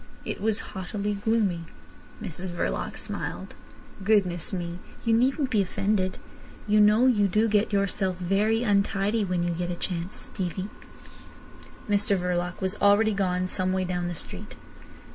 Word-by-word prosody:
It - - -4
was 220 0 +1
haughtily 200 +2 -2
gloomy. 200 -5 0 0.6
Mrs 180 +3 -5
Verloc 175 0 -2
smiled. - - -5 0.5
"Goodness 190 -5 +2
me! 175 -2 -4 0.3
You 230 - +3
needn't 260 +4 +2
be 215 -4 +4
offended. 195 0 0 0.5
You 210 0 +4
know 210 +4 +6
you 210 -6 +4
do 215 +4 +2
get 210 0 +2
yourself 195 -2 +1
very 205 +5 +1
untidy 205 0 +2
when 180 -3 0
you 175 - 0
get 175 +1 -2
a 175 - -2
chance, 175 +2 -3
Stevie." 190 +1 -4 1.2
Mr 205 -1 +2
Verloc 180 0 -1
was 190 0 0
already 210 +2 +5
gone 185 -2 0
some 185 0 -1
way 190 0 +1
down 180 -1 -2
the 175 - -3
street. - - -9
195 Hz, 145 wpm, -27 LUFS, 180-210 Hz, 1.2 s, know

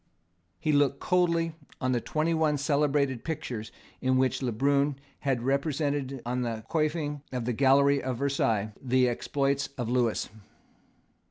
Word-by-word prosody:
He 155 - 0
looked 145 -1 +3
coldly 170 -2 +1 0.3
on 130 -1 0
the 120 -2 +1
twenty 155 +6 0
one 155 -2 +2
celebrated 140 -3 +1
pictures 125 -9 -4 0.3
in 130 0 +2
which 130 +1 +1
Le 125 -2 0
Brun 140 +4 +2 0.2
had 130 -4 -1
represented 140 -1 -1
on 125 +1 -1
the 115 -2 -3
coifing 155 -2 0
of 125 -3 -3
the 125 - 0
gallery 140 +3 +4
of 130 -2 -3
Versailles 115 -6 0
the 130 -1 +3
exploits 140 +3 0
of 120 -3 -2
Lewis. 120 -3 +1
140 Hz, 145 wpm, -28 LUFS, 125-145 Hz, 0.3 s, gallery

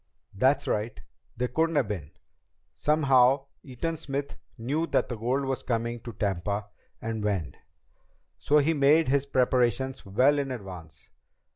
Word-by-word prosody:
"That's 130 +8 +2
right. 110 +1 -2 0.4
They 125 +1 0
couldn't 165 +4 0
have 140 -6 +2
been. 90 -9 -5 0.6
Somehow, 135 -3 +3 0.2
Eaton 155 +5 -4
Smith 140 -2 -4 0.2
knew 145 +8 -1
that - - +1
the 120 - -3
gold 125 +5 -1
was 135 -1 -2
coming 120 0 -2
to 120 +1 -8
Tampa, 100 +1 -2 0.3
and 110 -1 -4
when. 95 -10 -1 0.8
So 150 - +3
he 150 +2 +3
made 150 +1 +4
his 140 +1 +2
preparations 130 0 +1
well 130 +9 +3
in 140 -1 -2
advance. 90 - -9
125 Hz, 140 wpm, -27 LUFS, 105-140 Hz, 0.8 s, made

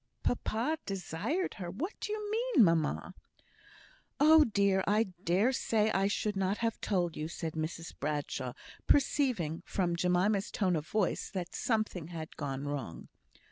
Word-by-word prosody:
"Papa 245 +6 0
desired 195 - -2
her! 175 - -4
What 300 - -4
do 420 - -4
you 425 -1 -3
mean, 460 - +4
mamma?" 165 -4 +1 1.1
"Oh, 310 +1 +7
dear! 200 -3 +2
I 210 0 +3
dare 190 +9 +3
say 220 -4 +1
I 195 -1 +2
should 210 0 -1
not 195 +1 0
have 230 -1 -2
told 175 -5 0
you," 155 - -3
said 165 -1 -5
Mrs 160 +1 -4
Bradshaw, 140 -4 -2 0.3
perceiving, 250 - +2
from 175 -3 -1
Jemima's 185 +4 +2
tone 185 -4 +1
of 155 -1 -3
voice, 210 -4 0
that 180 -3 -5
something 215 -8 -1
had 160 -2 -7
gone 140 -2 -4
wrong. 135 - -5
195 Hz, 145 wpm, -32 LUFS, 165-225 Hz, 1.1 s, Oh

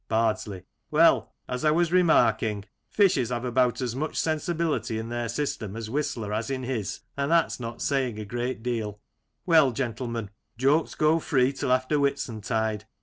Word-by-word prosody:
Bardsley: 110 -4 0 0.3
Well, - - +4 0.2
as 125 0 -4
I 155 - +4
was 170 +2 +2
remarking, 110 - +3 0.2
fishes 175 - +3
have 120 0 -2
about 125 0 +1
as 125 -2 -2
much 150 +4 -3
sensibility 155 -7 -1
in 110 +1 -5
their 120 -1 -3
system 115 -5 -3
as 110 -1 -6
Whistler 120 -7 -2
has 110 +5 -2
in 130 -1 -3
his, 120 -7 -3
and 140 0 -1
that's 170 -4 +2
not 115 -1 -5
saying 130 -6 0
a 110 - -5
great 120 +2 -3
deal 110 -4 -3 0.5
Well, 160 -7 +5
gentlemen, 115 -3 -3 0.3
jokes 140 +6 +2
go 155 +2 +3
free 135 -3 +2
till 135 - -2
after 130 +3 +2
Whitsuntide. 110 -5 -1
125 Hz, 160 wpm, -26 LUFS, 110-140 Hz, 0.5 s, Well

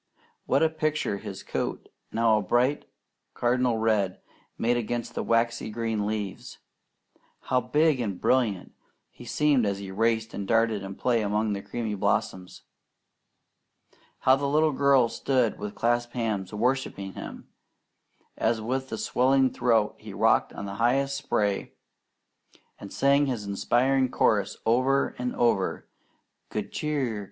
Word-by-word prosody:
What 135 +4 +3
a 160 - +4
picture 155 -9 -1
his 100 -2 -8
coat, - - -4 0.2
now 115 -1 +3
a - - -2
bright 125 +8 +1 0.5
cardinal 125 -1 +1
red, 110 -4 +1 0.4
made 120 +1 +1
against 120 0 -3
the - - -2
waxy 115 -1 0
green 110 -2 -2
leaves! 105 -3 -5 0.8
How 125 0 +1
big 145 +3 +2
and 100 -6 -3
brilliant 115 -8 +1 0.4
he - - -13
seemed 150 -5 +2
as 100 -2 0
he 100 -1 -7
raced 110 +2 0
and 100 -1 -5
darted 115 -2 +2
in 95 0 -7
play 120 0 +1
among 105 +1 0
the 100 - -4
creamy 115 -1 -4
blossoms! 95 -2 -2 1.6
How 130 - +5
the 140 +1 -2
little 155 +2 +3
girl 140 -3 +4
stood 125 -1 0
with 105 0 -6
clasped 120 +1 0
hands 105 -6 -2
worshipping 110 -4 -1
him, - - -9 0.9
as 110 0 0
with 125 0 -3
swelling 130 0 +2
throat 115 -3 +1
he - - -10
rocked - - +3
on - - -7
the 100 0 -6
highest 135 +3 +2
spray 100 -6 -1 1.1
and 100 - -9
sang 140 +1 +3
his 120 -6 -3
inspiring 125 +6 +1
chorus - - +1
over 130 +4 +2
and 125 0 -2
over: 110 -6 0 0.6
"Good - - -4
Cheer! 140 -8 -2
115 Hz, 140 wpm, -27 LUFS, 105-130 Hz, 1.6 s, How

